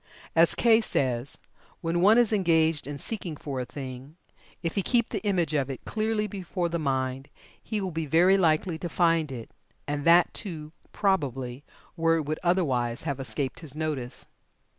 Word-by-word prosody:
As 165 +1 +5
Kay 230 -1 +5
says: 130 - -1 0.4
"When 170 +1 0
one 210 +5 +6
is 235 -3 +4
engaged 160 -6 +2
in 145 0 -5
seeking 175 0 -4
for 140 -3 -5
a 125 - -2
thing, 130 +2 -8 0.5
if 165 - -1
he 200 - +1
keep 235 +3 +1
the - - -3
image 180 -7 0
of 140 -3 0
it 135 - -7
clearly 220 -1 0
before 185 -3 -3
the 170 0 -2
mind, 135 -2 -2 0.3
he 215 - -3
will 190 -2 -3
be 160 -1 -3
very 175 +6 +5
likely 165 -2 +2
to 175 - -4
find 165 -3 +2
it, 120 -3 -7 0.4
and 145 0 -2
that 170 +2 +5
too, 155 -7 -6 0.2
probably, 135 - -1 0.3
where 165 0 +2
it 160 - 0
would 155 +1 -2
otherwise 135 -10 +1
have 140 -4 -3
escaped 135 0 -3
his 150 -4 -5
notice. 150 -6 -3
160 Hz, 175 wpm, -27 LUFS, 140-185 Hz, 0.5 s, one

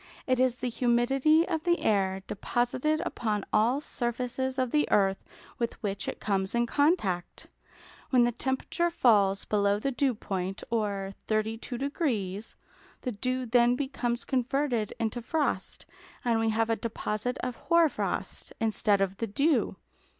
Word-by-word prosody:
It 255 -1 +1
is 255 -1 +3
the 250 0 -2
humidity 265 +7 +3
of 320 -1 -2
the 345 -1 +3
air 190 -2 +1
deposited 250 +9 0
upon 210 -3 -2
all 230 +6 +3
surfaces 250 0 -3
of 255 -2 0
the 300 0 +2
earth 195 -1 +2 0.4
with 235 -1 -1
which 200 -1 -2
it - - -4
comes 195 0 -1
in 235 0 +3
contact. 235 - 0 0.6
When 250 -2 +5
the 240 - +2
temperature 265 +7 -1
falls 205 - +3
below 200 -1 +2
the 275 +6 -1
dew 265 -1 +1
point, 190 -2 -4
or 200 -4 -1
32°, 225 - -2 0.5
the 250 - -2
dew 255 +4 -2
then 240 +1 +4
becomes 250 -3 -2
converted 255 -3 0
into 230 +1 -1
frost, 295 +5 -2 0.4
and 230 -2 +2
we 225 0 +2
have 225 +1 +1
a - - +3
deposit 225 +1 -3
of 250 -1 -3
hoar 335 -1 +4
frost, - - -3
instead 210 -2 +2
of 195 0 0
the 230 - -2
dew. 280 +10 +1
240 Hz, 145 wpm, -29 LUFS, 210-260 Hz, 0.6 s, When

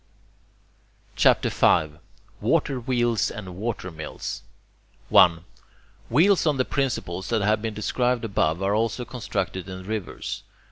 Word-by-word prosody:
CHAPTER - - +4
V 75 -1 +2 0.4
WATER 135 -2 +1
WHEELS 120 -2 +1
AND 95 -5 -8
WATER 100 -2 -4
MILLS 80 -1 -6 0.7
1. 85 -1 +5 0.6
Wheels 170 - +4
on 150 -3 +2
the 130 - +1
principles 95 -10 -2
that 110 -3 +1
have 105 +1 +2
been 110 -1 -3
described 120 +2 0
above 90 -4 0
are 100 +1 +1
also 115 +3 0
constructed 95 -7 -4
in 95 0 -7
rivers. 105 -1 -5
110 Hz, 125 wpm, -25 LUFS, 95-120 Hz, 0.7 s, 1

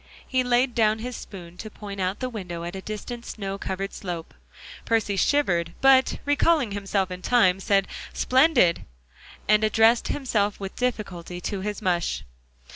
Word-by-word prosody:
He 255 -1 +1
laid 245 +1 +2
down 220 -2 +3
his 245 +2 -5
spoon 180 -5 -10
to 215 - -7
point 200 -1 -8
out 185 +5 -2
the 255 - -1
window 180 -7 -6
at 175 +2 -5
a 190 - -5
distant 225 +4 -6
snow 195 -3 -5
covered 195 +1 -4
slope. 175 -3 -6 0.5
Percy 220 -3 +1
shivered, 175 -8 +1
but 265 -1 +5
recalling 290 -4 +2
himself 195 -1 -1
in 180 0 -6
time, 190 -6 +3
said 195 0 +2 0.2
"Splendid," 255 - +3 0.6
and 215 0 +4
addressed 225 +2 +4
himself 210 -7 0
with 195 -1 -6
difficulty 195 -8 -3
to 195 +1 -3
his 210 +1 -4
mush. 175 - 0
205 Hz, 155 wpm, -25 LUFS, 185-240 Hz, 0.6 s, but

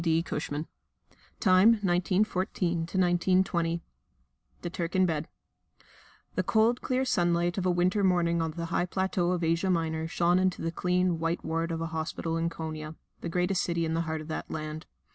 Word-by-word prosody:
D. 165 0 +2
Cushman_ 150 -2 -3 0.7
(Time 190 +3 +6
1914 185 -2 0
1920) 175 -1 +1 0.8
The - - -2
Turk 170 +1 -3
in 185 0 +5
Bed 160 -3 -1 1.1
The 185 - +1
cold, 220 +6 +2
clear 260 +1 0
sunlight 175 -3 +1
of 185 - 0
a - - +3
winter 180 +3 +2
morning 170 -2 +2
on 160 - 0
the 170 +2 -5
high 175 - +1
plateau 185 -1 0
of 180 -1 0
Asia 165 +3 +1
Minor 160 -2 0
shone 175 +2 +2
into 185 -1 0
the 165 - -1
clean, 180 0 +1
white 165 +1 -1
ward 165 +1 -1
of 165 0 -3
a - - -1
hospital 160 +1 -3
in 165 0 0
Konia 155 -1 -6 0.2
(the - - -5
greatest 180 +2 +1
city 170 -1 0
in 160 - -1
the 165 - +1
heart 160 -1 -3
of 155 - -9
that 160 - -4
land). 155 0 -5
175 Hz, 175 wpm, -29 LUFS, 165-185 Hz, 1.1 s, Time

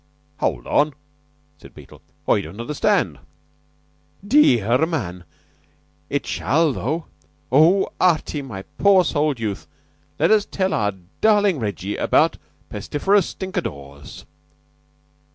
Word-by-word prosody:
"Hold - - -2
on," 150 -1 +1 0.6
said - - -16
Beetle. - - -15 0.3
"I 100 - +3
don't 100 +2 -10
understand." 140 +5 0 1.1
"Dearr 130 - +4
man! 90 - -4 0.8
It - - -2
shall, 155 0 +1
though. 155 +7 -3 0.5
Oh, 165 +8 +4
Artie, 160 -4 +1
my 110 -8 -8 0.2
pure 195 -3 +5
souled 150 -4 0
youth, 105 -4 -4 0.5
let - - +2
us 215 -2 +4
tell 190 -2 -1
our 105 -1 0 0.3
darling 205 -6 +3
Reggie 100 -2 -4
about - - +2 0.3
Pestiferous 195 +6 +1
Stinkadores." 70 - -7
150 Hz, 105 wpm, -21 LUFS, -, 1.1 s, pure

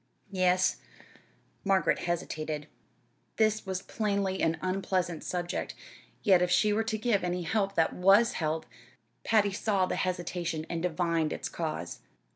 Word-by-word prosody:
"Yes." 185 -1 +2 0.9
Margaret 195 -1 +2
hesitated. 155 -3 -3 0.7
This 215 -2 +2
was 190 0 -3
plainly 200 -3 -1
an 165 0 +2
unpleasant 185 -2 -1
subject, 175 -1 -3 0.5
yet 190 -5 +5
if 180 - +2
she 210 +4 +3
were 220 +2 +1
to 220 -1 -2
give 215 -3 +1
any 180 0 -1
help 200 +2 0
that 165 - +2
was 195 +5 +5
help 160 0 -2 0.6
Patty 210 -3 +3
saw 195 -1 +1
the - - -3
hesitation, 175 -3 -2
and 165 -1 -2
divined 170 -2 0
its - - -4
cause. - - -4
185 Hz, 135 wpm, -29 LUFS, 170-200 Hz, 0.9 s, yet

